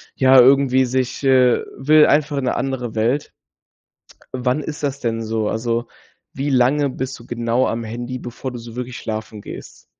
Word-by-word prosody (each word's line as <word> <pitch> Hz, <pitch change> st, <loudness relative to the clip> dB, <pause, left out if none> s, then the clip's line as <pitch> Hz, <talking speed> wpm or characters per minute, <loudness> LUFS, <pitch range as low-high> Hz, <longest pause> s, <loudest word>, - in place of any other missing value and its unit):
ja 130 Hz, 0 st, +6 dB
irgendwie 130 Hz, 0 st, +5 dB
sich, 130 Hz, +2 st, -2 dB
äh 130 Hz, -2 st, +4 dB
will 150 Hz, +3 st, +5 dB
einfach 145 Hz, 0 st, +2 dB
'ne 125 Hz, -, -1 dB
andere 125 Hz, -3 st, -3 dB
Welt. 120 Hz, +6 st, 0 dB, 1.0 s
Wann 125 Hz, +3 st, 0 dB
ist 150 Hz, +1 st, -6 dB
das 140 Hz, -1 st, -2 dB
denn 115 Hz, -1 st, -2 dB
so? 110 Hz, -1 st, -2 dB
Also, 115 Hz, +2 st, -1 dB, 0.5 s
wie 140 Hz, +2 st, -2 dB
lange 135 Hz, +3 st, +2 dB
bist 130 Hz, 0 st, -5 dB
du 115 Hz, -, -15 dB
genau 120 Hz, +1 st, 0 dB
am 115 Hz, +1 st, -3 dB
Handy, 120 Hz, +3 st, -5 dB
bevor 125 Hz, +1 st, -7 dB
du 125 Hz, -, -7 dB
so 115 Hz, -1 st, -10 dB
wirklich 125 Hz, 0 st, -5 dB
schlafen 110 Hz, -1 st, -6 dB
gehst? -, -, -11 dB
125 Hz, 170 wpm, -20 LUFS, 115-135 Hz, 1.0 s, ja